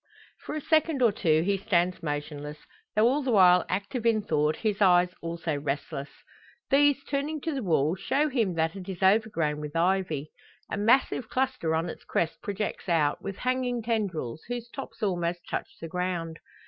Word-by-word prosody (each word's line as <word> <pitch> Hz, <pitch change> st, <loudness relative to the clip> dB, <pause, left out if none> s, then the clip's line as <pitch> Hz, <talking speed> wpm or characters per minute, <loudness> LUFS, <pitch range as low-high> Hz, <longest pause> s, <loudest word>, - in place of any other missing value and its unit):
For -, -, -4 dB
a 310 Hz, -, -3 dB
second 310 Hz, -3 st, +2 dB
or 230 Hz, -, +5 dB
two 160 Hz, -6 st, +2 dB
he 195 Hz, +1 st, +1 dB
stands 180 Hz, -3 st, +1 dB
motionless, 150 Hz, -1 st, -4 dB, 0.4 s
though 215 Hz, +2 st, +5 dB
all 275 Hz, +4 st, +2 dB
the 265 Hz, -, -2 dB
while 180 Hz, -5 st, +6 dB
active 200 Hz, +6 st, -2 dB
in 225 Hz, -2 st, +2 dB
thought, 150 Hz, -4 st, +1 dB
his 210 Hz, -2 st, -2 dB
eyes 180 Hz, -2 st, +5 dB
also 165 Hz, -2 st, -3 dB
restless. 140 Hz, 0 st, -3 dB, 0.6 s
These, 280 Hz, 0 st, +4 dB
turning 290 Hz, +2 st, -2 dB
to 320 Hz, -, -2 dB
the 270 Hz, -, -2 dB
wall, 160 Hz, -, +2 dB
show 285 Hz, +9 st, +1 dB
him 230 Hz, -, 0 dB
that 160 Hz, +1 st, 0 dB
it 195 Hz, -1 st, -8 dB
is 190 Hz, -1 st, -5 dB
overgrown 190 Hz, -7 st, +2 dB
with 150 Hz, 0 st, -7 dB
ivy. 165 Hz, -4 st, 0 dB, 0.4 s
A -, -, 0 dB
massive 225 Hz, +2 st, +2 dB
cluster 255 Hz, -11 st, 0 dB
on 165 Hz, +2 st, 0 dB
its -, -, -8 dB
crest 165 Hz, -1 st, -1 dB
projects 205 Hz, -1 st, -4 dB
out, 150 Hz, -4 st, +2 dB
with 195 Hz, -1 st, -5 dB
hanging 250 Hz, -2 st, -1 dB
tendrils, 185 Hz, -, -2 dB
whose 240 Hz, -1 st, -5 dB
tops 270 Hz, -4 st, -8 dB
almost 175 Hz, -3 st, -1 dB
touch -, -, -3 dB
the 165 Hz, -, -6 dB
ground. 170 Hz, -1 st, -3 dB
190 Hz, 175 wpm, -28 LUFS, 165-235 Hz, 0.6 s, while